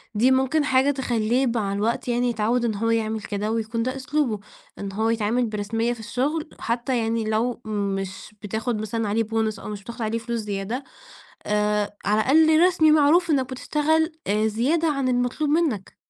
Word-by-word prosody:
دي 245 +5 +4
مُمكن 265 +4 +2
حاجه 265 0 +3
تخلّيه 250 -1 0
مع 220 -4 -1
الوقت 215 +5 -1
يعني، 245 0 +1
يتعود 235 +2 0
إن 220 -3 0
هو 230 +3 -1
يعمل 220 -1 0
كده، 205 +1 -3
ويكون 230 0 -1
ده 255 +2 -2
أسلوبه، 270 -4 -1 0.4
إن 200 -1 -4
هو 220 +3 0
يتعامل 230 +2 +1
برسمية 225 +2 -1
في 240 - -11
الشغل، 290 +8 -2
حتّى 240 +2 -1
يعني 225 0 0
لو 230 +3 -1
مش 200 -1 -4
بتاخد 220 +2 -2
مثلًا 220 +1 -2
عليه 225 +2 +1
Bonus 220 -1 -1
أو - - -8
مش 205 -1 -6
بتاخد 235 +3 -8
عليه 220 +1 -1
فلوس 235 +1 -3
زيادة، 210 +4 -3 0.6
آآ 210 0 0
على 210 +2 +3
الأقل 315 +5 +5
رسمي، 315 -4 +4
معروف 310 +3 +4
إنّك 265 -2 +1
بتشتغل 315 +5 +1 0.2
آآ 215 +2 +2
زيادة 275 +10 +1
عن 275 -3 0
المطلوب 245 +4 0
منّك. 295 - 0
230 Hz, 175 wpm, -24 LUFS, 215-265 Hz, 0.6 s, الأقل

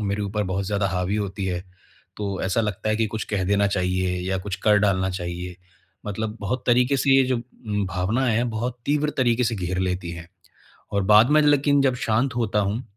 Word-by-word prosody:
मेरे 100 0 -1
ऊपर 105 +1 -2
बहुत 95 +1 -2
ज़्यादा 100 -1 0
हावी 95 +2 -1
होती 100 -1 -3
है, 90 0 -3 0.5
तो 100 -2 -3
ऐसा 95 +4 +1
लगता 110 0 -2
है 110 - +1
कि 115 - +1
कुछ 110 +1 -4
कह 95 -2 0
देना 100 +1 +2
चाहिए 90 -1 0
या 95 - 0
कुछ 95 0 -4
कर 105 -1 +5
डालना 95 -2 +1
चाहिए। 90 0 -5 0.5
मतलब 105 +2 -3
बहुत 125 +5 -3
तरीक़े 125 +3 +3
से 135 +1 +1
ये 135 - +6
जो 130 0 0 0.5
भावनाएँ 110 +7 0
हैं, 120 +2 +1
बहुत 120 +3 -3
तीव्र 150 +1 +1
तरीक़े 125 -1 +2
से 115 0 0
घेर 90 0 -3
लेती 90 -2 -2
हैं। 85 0 -9 0.7
और 100 -1 +1
बाद 105 +5 +6
में 155 +1 +5
लेकिन 145 -1 +3
जब 130 -2 +2
शांत 120 +1 0
होता 110 -3 0
हूँ, 105 +5 -1
105 Hz, 205 wpm, -23 LUFS, 95-120 Hz, 0.7 s, ये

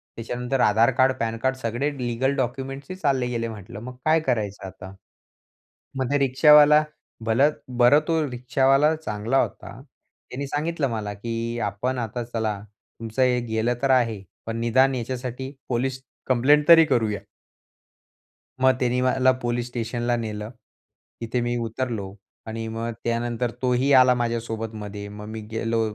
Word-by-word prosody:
त्याच्यानंतर 125 +3 -3
आधार 110 +4 +4
card, 130 +1 +5
pan 115 0 -1
card 130 +3 0
सगळे 125 +4 -2
legal 125 +2 -1
documents 135 +2 -3
ही 185 - -5
चालले 135 -8 0
गेले 115 -1 -2
म्हंटलं. 105 -3 -9
मग 125 +3 -8
काय 160 +1 +4
करायचं 105 -5 -1
आता? 95 0 -10 1.0
मग 130 -1 -1
ते 145 - +3
रिक्षावाला, 150 +3 +6 0.4
भलं 125 +7 +3 0.3
बरं 125 +4 +6
तो 165 -1 +2
रिक्षावाला 135 +4 +2
चांगला 115 -3 -2
होता. - - -6 0.5
त्याने 140 +3 -5
सांगितलं 150 +1 -1
मला 105 -3 -3
की 115 +2 -4
आपण 125 +6 -3
आता 120 +1 -3
चला. 110 -3 -3 0.4
तुमचं 115 +3 -3
हे 125 -1 +3
गेलं 110 +2 0
तर 135 - +1
आहे 115 -6 +2 0.2
पण 115 0 -4
निदान 130 +3 +3
याच्यासाठी 125 +2 -5 0.2
पोलिस 130 +1 -1 0.3
कंप्लेंट 140 +4 +3
तरी 165 -1 +9
करूया. 110 -8 0 1.4
मग 130 0 +5
त्यांनी 125 0 +1
मला 130 0 +3
पोलीस 120 0 -1
स्टेशनला 120 0 -2
नेलं. 105 -2 -5 0.7
तिथे 115 +2 -1
मी 120 0 -1
उतरलो. 115 -4 -3 0.3
आणि 115 0 -4
मग 115 +1 -4
त्यानंतर 120 0 -1
तोही 130 +2 +1
आला 130 -1 +7
माझ्या 120 -1 -1
सोबत 115 -1 -5
मध्ये. 105 -1 -7
मग 105 0 -9
मी 110 0 -6
गेलो 115 0 -1
120 Hz, 150 wpm, -24 LUFS, 115-130 Hz, 1.4 s, तरी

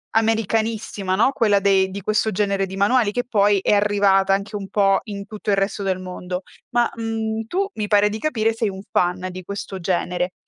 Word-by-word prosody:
americanissima, 220 -3 0
no, 230 +7 +3
quella 210 -6 +3
dei 195 -1 +3
di 200 +1 -6
questo 215 +2 +1
genere 200 0 0
di 190 - -7
manuali 210 +2 +3
che 245 +3 -2
poi 205 -3 +3
è - - +2
arrivata 200 -2 +3
anche 200 +2 -2
un 195 -1 -5
po' 195 -2 +3
in 200 -2 -6
tutto 210 0 -6
il 200 - +2
resto 195 +1 -1
del 190 -1 -1
mondo. 180 0 -6 0.3
Ma, 240 -1 +2
mhmm, 225 -1 -3
tu 390 +8 -1
mi 210 -1 -2
pare 205 0 +4
di 215 +1 -5
capire 225 -7 0
sei 225 -1 -1
un 190 0 -7
fan 180 +1 0
di 185 0 -8
questo 200 0 -6
genere. 180 0 -1
205 Hz, 200 wpm, -21 LUFS, 195-220 Hz, 0.3 s, pare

